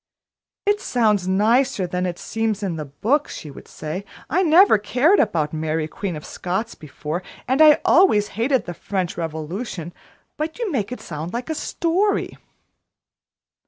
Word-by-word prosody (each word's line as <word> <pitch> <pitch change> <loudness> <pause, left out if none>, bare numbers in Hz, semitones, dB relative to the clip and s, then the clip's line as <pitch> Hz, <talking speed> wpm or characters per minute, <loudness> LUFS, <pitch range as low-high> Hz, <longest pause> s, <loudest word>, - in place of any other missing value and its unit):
"It 410 +1 +2
sounds 210 -6 +1
nicer 210 +2 +2
than 180 +1 -2
it 175 -1 -4
seems 220 -2 -2
in 185 -4 -1
the 155 -1 -5
book," 235 - 0
she 150 - -8
would - - -12
say. 160 +6 -6 0.3
"I 365 - +3
never 345 - +6
cared 255 - +3
about 165 -9 +1
Mary, 155 0 -1
Queen 185 +2 -4
of 150 - -8
Scots, 190 +6 -3
before, 155 +3 -5 0.3
and 260 +4 +2
I 305 -1 +8
always 215 - +5
hated 240 +3 0
the 175 - -5
French 185 0 -3
Revolution, 170 +3 -5 0.4
but 315 +1 -3
you 465 -5 -2
make 220 -7 -1
it 250 - -6
seem 155 0 -6
like 240 - -4
a - - +1
story." 350 +6 0
210 Hz, 160 wpm, -22 LUFS, 170-275 Hz, 0.4 s, I